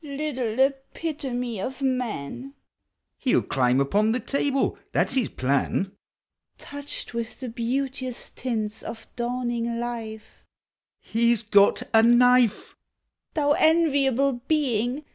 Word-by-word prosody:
Little 275 -6 -3
epitome 270 - -1
of 265 +6 -5
man! 255 - -3 0.6
(He 255 - 0
'11 - - +1
climb 125 -1 +2
upou 205 +11 +2
the 245 - 0
table, 275 +3 -1
that - - +1
's - - -4
his 260 -3 +1
plan,) 140 +8 0 0.7
Touched 285 -3 -6
with 235 0 -4
the 255 - -5
beauteous 255 +2 -3
tints 220 -4 -3
of 225 - -8
dawning 240 -1 -2
life, 225 -2 -6 0.7
(lie 235 +1 +4
's 225 - -7
got 205 -1 +4
a 225 - +7
knife 240 -1 +4 0.3
!) - - -56
Thou 290 -2 +2
enviable 280 -5 +3
being! 265 -2 0
245 Hz, 125 wpm, -25 LUFS, 225-275 Hz, 0.7 s, a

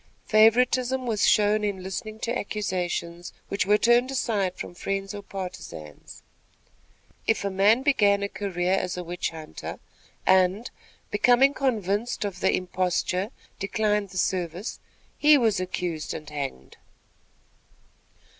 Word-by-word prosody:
Favoritism 250 +4 +3
was 220 -4 +2
shown 210 0 +3
in 200 -3 -2
listening 215 +3 -5
to 235 +1 -1
accusations, 180 -5 -3 0.2
which 200 - -1
were 210 +1 +5
turned 240 +3 +4
aside 210 -8 -1
from - - -7
friends 195 +2 -3
or 205 - -6
partisans. 180 - -8 1.0
If 225 -2 +1
a 200 - -1
man 205 +6 +4
began 205 -8 +3
a - - 0
career 185 -3 -2
as 180 -2 -1
a 180 - -4
witch 175 +1 -3
hunter, 160 -1 -8 0.5
and, 190 +4 +3 0.4
becoming 245 +6 +4
convinced 220 -5 -1
of 190 -3 -5
the 190 - +2
imposture, 185 +1 -1 0.3
declined 210 0 0
the 185 - -8
service, 180 +2 -2 0.4
he 300 0 +7
was 225 -7 +2
accused 180 -3 -3
and 155 -1 -8
hanged. 140 - -6
200 Hz, 125 wpm, -26 LUFS, 180-220 Hz, 1.0 s, he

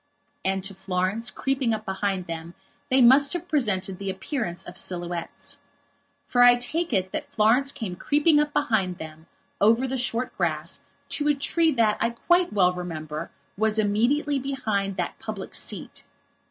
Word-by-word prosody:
And 190 0 0
to 195 +1 -1
Florence, 190 +4 -1
creeping 265 -4 0
up 215 0 -8
behind 190 -1 -2
them, 165 0 -7 0.3
they 260 0 +4
must 275 +4 +6
have 350 0 -4
presented 205 - 0
the 195 -1 -4
appearance 190 - -3
of 175 - -10
silhouettes. 175 -2 -2 0.7
For 245 - +2
I 245 0 +8
take 310 +8 -2
it 190 -4 0
that - - -5
Florence 240 +6 +3
came 215 -11 -5
creeping 295 - +3
up 300 0 +1
behind 210 -11 0
them 160 0 -10 0.3
over 225 +5 +4
the 265 0 -2
short 245 0 -1
grass 165 -1 -1 0.3
to 295 - 0
a 295 - +4
tree 320 +4 +2
that, 225 -4 +2
I 230 - +2
quite 350 +9 +2
well 180 -3 +3
remember, 160 -3 -5 0.3
was 220 +1 +2
immediately 240 +8 +1
behind 215 -8 -2
that - - -3
public - - -6
seat. - - -4
215 Hz, 160 wpm, -25 LUFS, 185-270 Hz, 0.7 s, I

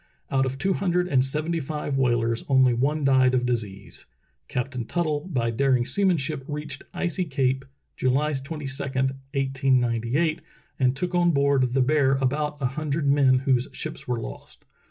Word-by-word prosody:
Out 135 -1 +2
of 130 +1 -4
two 195 +6 +1
hundred 180 -1 0
and 130 -7 +3
seventy 155 +5 0
five 150 -1 -3
whalers 120 -3 +1
only 130 -2 +5
one 145 +5 0
died 130 -1 +4
of 125 -1 +1
disease. 105 -5 -4 0.4
Captain 125 0 -3
Tuttle 155 +4 -2
by 115 -5 0
daring 125 0 +2
seamanship 160 -8 0
reached 150 0 -5
Icy 175 +1 -1
Cape 135 -2 0 0.3
July 135 +4 +1
22, 140 +1 -5
1898, 135 +1 0 0.4
and 130 -1 +2
took 180 +5 -3
on 175 -1 +3
board 140 -4 +2
the 130 -1 +3
Bear 140 0 +3
about 145 +3 -1
a 135 - -1
hundred 150 +2 -2
men 140 -2 +4
whose 130 -1 +2
ships 155 - -6
were 125 -2 -1
lost. - - -10
135 Hz, 155 wpm, -25 LUFS, 130-150 Hz, 0.4 s, only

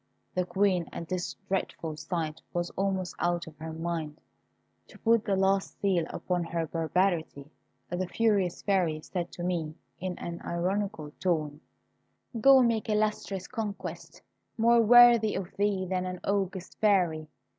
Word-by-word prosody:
The 180 0 0
Queen 190 -3 +1
at 170 - -6
this 180 0 -3
dreadful 170 -4 -2
sight 155 0 -4
was 175 0 -2
almost 190 -2 -1
out 175 0 0
of 160 - -12
her 160 +1 -6
mind. 160 -2 -4 0.7
To - - -15
put 230 0 +2
the 200 - +1
last 195 0 +1
seal 185 -5 +1
upon 180 -1 -2
her 165 0 -2
barbarity, 160 -3 -1 0.4
the 175 +1 -2
furious 200 -5 +1
Fairy 175 -6 +1
said 175 +1 -4
to 175 - -6
me, 165 -4 -2 0.2
in 185 0 -4
an 170 0 -6
ironical 180 -2 -2
tone, 155 -5 -1 0.8
"Go 270 +2 +7
make 230 -2 0
illustrious 210 -3 -1
conquests, 220 -5 -6 0.3
more 235 +1 +5
worthy 235 -1 +7
of 190 -1 -5
thee 200 -2 +1
than 185 0 -1
an 180 0 -5
august 195 -2 -2
Fairy. 175 -7 +2
185 Hz, 145 wpm, -29 LUFS, 170-200 Hz, 0.8 s, Go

